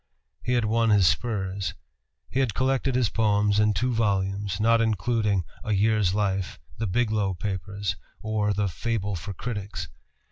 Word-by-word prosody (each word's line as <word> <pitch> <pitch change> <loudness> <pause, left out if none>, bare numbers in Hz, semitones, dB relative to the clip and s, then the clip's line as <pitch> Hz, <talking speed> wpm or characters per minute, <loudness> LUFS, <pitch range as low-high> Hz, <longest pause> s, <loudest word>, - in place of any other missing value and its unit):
He 125 - -1
had 120 -3 +2
won 115 +1 +2
his 100 -3 +5
spurs. 100 -2 0 0.5
He 130 - -2
had 125 -6 +1
collected 135 0 +1
his 125 -4 +2
poems 105 -2 +2
in 105 -1 +3
two 125 0 +1
volumes, 100 -2 0
not 115 +1 +4
including 105 -2 +1 0.2
"A 110 -3 -1
Year's 105 -2 +2
Life," 100 -3 -1 0.2
the 110 - 0
"Biglow 105 -2 +1
Papers," 100 -1 -3 0.2
or 105 -1 0
the 100 0 0
"Fable 105 +1 -2
for 95 +4 -6
Critics." 105 -2 -5
105 Hz, 150 wpm, -26 LUFS, 100-115 Hz, 0.5 s, his